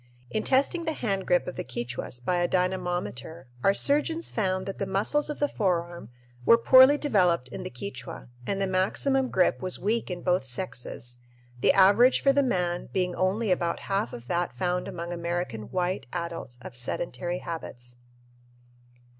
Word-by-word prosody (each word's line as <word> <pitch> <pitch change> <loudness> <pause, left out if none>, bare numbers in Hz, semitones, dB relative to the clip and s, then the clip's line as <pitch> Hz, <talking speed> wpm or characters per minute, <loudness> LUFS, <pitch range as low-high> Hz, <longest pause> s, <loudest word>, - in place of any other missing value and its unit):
In 215 - 0
testing 285 +6 +2
the 320 - 0
hand 195 -9 -2
grip 180 - +3
of 180 - -6
the - - -3
Quichuas 120 0 -5
by 180 +8 0
a 175 0 +2
dynamometer 175 - -2 0.2
our 195 - +4
surgeons 300 +6 +2
found 185 -4 -1
that 195 - -6
the 195 - -2
muscles 210 +11 +1
of 295 - -4
the 290 - +2
forearm 175 - -2 0.3
were 230 - +7
poorly 260 +4 +7
developed 180 - +2
in - - -7
the - - -5
Quichua 160 +5 -8 0.2
and 200 - -1
the 195 - +1
maximum 250 +8 +1
grip 185 - +2
was 185 -1 -2
weak 220 +3 -1
in 175 -1 -5
both 180 -3 +2
sexes, 125 -3 -4 0.4
the - - +4
average 205 +7 +6
for 275 - +3
the 280 - +4
man 180 -9 -1
being 180 -1 0
only 195 +3 0
about 170 -2 0
half 200 +2 -1
of 120 - -9
that 175 +6 -1
found 180 -1 -1
among 170 0 -5
American 170 -10 -3
white 180 -7 -2
adults 170 -7 -5
of - - -9
sedentary 175 +8 -3
habits. 120 -9 -7
180 Hz, 170 wpm, -27 LUFS, 170-210 Hz, 0.4 s, were